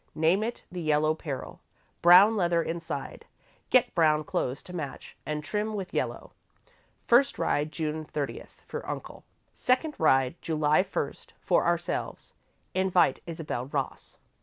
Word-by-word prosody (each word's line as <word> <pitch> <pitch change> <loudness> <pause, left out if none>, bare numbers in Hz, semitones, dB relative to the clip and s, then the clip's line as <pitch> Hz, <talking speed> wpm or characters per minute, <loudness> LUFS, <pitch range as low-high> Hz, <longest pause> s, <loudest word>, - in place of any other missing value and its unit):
Name 165 +6 +3
it 235 +2 -4
'The 180 -1 -5
Yellow 155 0 +2
Peril.' 150 -4 -6 0.4
Brown 185 +6 +8
leather 170 -4 +2
inside. 165 0 -5 0.5
Get 255 -2 +4
brown 155 -3 +3
clothes 130 -2 -2
to 180 - -11
match 150 -6 -6
and 150 0 -2
trim 210 +5 -2
with 195 -3 -5
yellow. - - -3 0.7
First 260 +4 +4
ride, 150 +1 0
June 155 -1 -3
thirtieth, 150 -2 -6
for - - -5
Uncle. - - -7 0.3
Second 260 +5 +1
ride, 135 -1 +3
July 155 0 +2
first, 190 +1 -5
for - - +2
ourselves. - - -2 0.4
Invite 185 -1 +2
Isabel 155 -7 -4
Ross." 140 -2 -4
165 Hz, 135 wpm, -28 LUFS, 150-185 Hz, 0.7 s, Brown